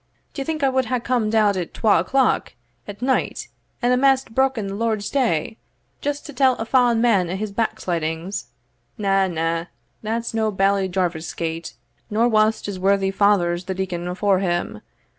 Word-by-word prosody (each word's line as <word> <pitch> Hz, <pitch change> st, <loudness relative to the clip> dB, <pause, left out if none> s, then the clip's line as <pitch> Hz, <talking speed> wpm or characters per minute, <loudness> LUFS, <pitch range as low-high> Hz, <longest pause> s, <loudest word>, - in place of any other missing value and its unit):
D'ye 275 Hz, -, -3 dB
think 310 Hz, 0 st, -3 dB
I 270 Hz, -, +4 dB
wad 260 Hz, -1 st, +1 dB
hae 250 Hz, +1 st, -1 dB
comed 230 Hz, -2 st, 0 dB
out 210 Hz, -2 st, +4 dB
at 180 Hz, -3 st, -4 dB
twal 215 Hz, -6 st, +3 dB
o'clock 260 Hz, +9 st, +1 dB, 0.3 s
at 205 Hz, +3 st, -8 dB
night, 260 Hz, 0 st, -1 dB, 0.3 s
and 245 Hz, +1 st, +3 dB
amaist 265 Hz, -1 st, +3 dB
broken 265 Hz, -4 st, +1 dB
the 195 Hz, -, -4 dB
Lord's 215 Hz, -1 st, -1 dB
day, 230 Hz, -, 0 dB, 0.4 s
just 290 Hz, 0 st, -3 dB
to 295 Hz, -, -8 dB
tell 260 Hz, 0 st, +3 dB
a 225 Hz, -, -4 dB
fa'en 245 Hz, -1 st, +3 dB
man 210 Hz, -7 st, +3 dB
o' 180 Hz, -, -2 dB
his 210 Hz, +1 st, -4 dB
backslidings? 175 Hz, -4 st, -2 dB, 0.5 s
Na, 195 Hz, -2 st, +2 dB
na, 165 Hz, -1 st, -1 dB, 0.4 s
that's 230 Hz, +2 st, -3 dB
no 220 Hz, -1 st, +1 dB
Bailie 195 Hz, -1 st, +1 dB
Jarvie's 175 Hz, -3 st, -2 dB
gate, 165 Hz, 0 st, -4 dB, 0.3 s
nor 225 Hz, +2 st, +2 dB
was't 215 Hz, -1 st, +2 dB
his 200 Hz, -2 st, -5 dB
worthy 195 Hz, 0 st, +2 dB
father's 190 Hz, -3 st, +2 dB
the 190 Hz, +1 st, -3 dB
deacon 180 Hz, -2 st, -3 dB
afore 190 Hz, +1 st, +1 dB
him. 175 Hz, -2 st, -2 dB
205 Hz, 170 wpm, -22 LUFS, 185-240 Hz, 0.5 s, I